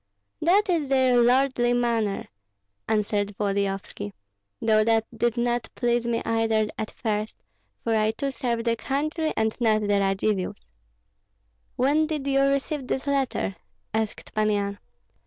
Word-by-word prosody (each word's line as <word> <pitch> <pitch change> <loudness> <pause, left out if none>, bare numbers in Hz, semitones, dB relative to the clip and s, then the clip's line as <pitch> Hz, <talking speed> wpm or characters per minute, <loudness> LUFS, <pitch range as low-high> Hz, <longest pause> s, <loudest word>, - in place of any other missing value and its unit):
"That 385 +6 +4
is 325 -7 0
their 260 -2 +4
lordly 245 0 +3
manner," 230 -4 0 0.6
answered 205 -1 0
Volodyovski; 195 - -2 0.5
"though 215 -1 +3
that 225 0 +2
did 235 +1 0
not 240 -1 0
please 240 -1 +1
me 230 -1 0
either 225 -1 +1
at 220 -1 -4
first, 215 -2 -3 0.5
for 225 - +1
I 215 0 +3
too 275 +5 -2
serve 240 -4 -2
the 230 0 +1
country 305 +6 -1
and 220 0 +1
not 215 -2 +3
the 205 -1 +2
Radzivills." 195 - -1 1.1
"When 295 +5 +2
did 305 -3 -3
you 275 -1 +2
receive 275 0 0
this 265 - -2
letter?" 270 - -1 0.4
asked 220 -1 -3
Pan 215 0 +2
Yan. 200 -1 -1
230 Hz, 140 wpm, -25 LUFS, 215-265 Hz, 1.1 s, That